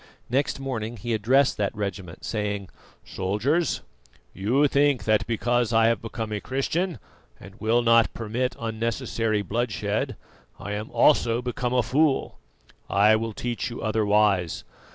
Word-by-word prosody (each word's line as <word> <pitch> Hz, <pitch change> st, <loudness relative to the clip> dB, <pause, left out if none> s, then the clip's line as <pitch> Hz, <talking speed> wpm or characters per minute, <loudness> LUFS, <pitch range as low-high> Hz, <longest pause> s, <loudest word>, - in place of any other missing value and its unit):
Next 135 Hz, +2 st, 0 dB
morning 120 Hz, -4 st, -4 dB
he 115 Hz, +4 st, -3 dB
addressed 130 Hz, +6 st, +3 dB
that 100 Hz, -1 st, -1 dB
regiment, 95 Hz, -4 st, -5 dB
saying: 105 Hz, -3 st, -3 dB, 0.4 s
"Soldiers, 110 Hz, -, 0 dB, 0.5 s
you 125 Hz, +10 st, +2 dB
think 140 Hz, -5 st, +2 dB
that 110 Hz, -1 st, +2 dB
because 120 Hz, 0 st, +1 dB
I 115 Hz, 0 st, +4 dB
have 115 Hz, -, 0 dB
become 110 Hz, -1 st, -5 dB
a 105 Hz, -1 st, -3 dB
Christian 160 Hz, +7 st, -1 dB, 0.4 s
and 95 Hz, +1 st, -12 dB
will 115 Hz, +2 st, +2 dB
not 115 Hz, -1 st, +5 dB
permit 120 Hz, +3 st, -2 dB
unnecessary 115 Hz, -1 st, -1 dB
bloodshed, 105 Hz, -1 st, -2 dB, 0.4 s
I 100 Hz, -, -6 dB
am 105 Hz, +1 st, -4 dB
also 120 Hz, -1 st, +3 dB
become 125 Hz, 0 st, -2 dB
a 125 Hz, -, +3 dB
fool. 145 Hz, +2 st, +1 dB, 0.5 s
I 105 Hz, +3 st, +5 dB
will 110 Hz, 0 st, -2 dB
teach 120 Hz, +3 st, -3 dB
you 120 Hz, -, -7 dB
otherwise. 105 Hz, -5 st, +2 dB
115 Hz, 135 wpm, -25 LUFS, 105-125 Hz, 0.5 s, not